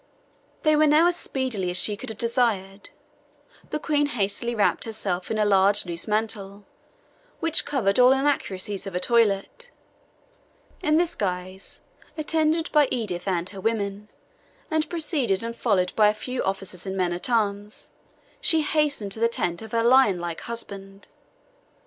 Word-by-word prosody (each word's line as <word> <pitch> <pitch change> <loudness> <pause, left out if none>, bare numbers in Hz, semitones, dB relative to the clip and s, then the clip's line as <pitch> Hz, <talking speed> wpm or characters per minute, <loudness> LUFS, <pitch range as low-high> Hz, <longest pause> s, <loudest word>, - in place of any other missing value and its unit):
They 310 -1 +4
were 305 +1 +4
now 305 +3 +5
as 350 0 +3
speedy 250 - -2
as 180 - 0
she 205 +3 +3
could 255 +4 -8
have 220 - -7
desired. 215 -5 -1 0.8
The - - -2
Queen 290 -1 0
hastily 235 -1 -2
wrapped 210 - +1
herself 195 -5 -3
in 220 - -1
a 210 - +2
large 200 0 +4
loose 170 +2 -5
mantle, 210 -2 -2 0.7
which 330 -2 +1
covered 235 -7 +1
all 250 +1 +7
inaccuracies 210 -8 -1
of 195 - -6
the 180 - -1
toilet. 230 - +1 1.1
In 305 -3 +2
this 345 0 +2
guise, 185 - -5 0.4
attended 315 +1 0
by 300 -2 +4
Edith 205 -7 -3
and 175 -2 -1
her 195 -1 -9
women, 205 -1 -2 0.6
and 315 0 0
preceded 290 - 0
and 230 0 -5
followed 190 -7 0
by 215 -1 +5
a 210 - +2
few 250 +3 -4
officers 195 -1 -4
and 190 0 -4
men 180 -2 0
at 175 +7 -4
arms, 210 -2 -2 0.5
she 320 -2 +3
hastened 295 -9 0
to 220 - -1
the 230 +1 +3
tent 175 -6 -2
of 220 -1 -10
her 230 0 +1
lionlike 200 -10 +3
husband. 200 -4 -7
215 Hz, 155 wpm, -24 LUFS, 195-265 Hz, 1.1 s, all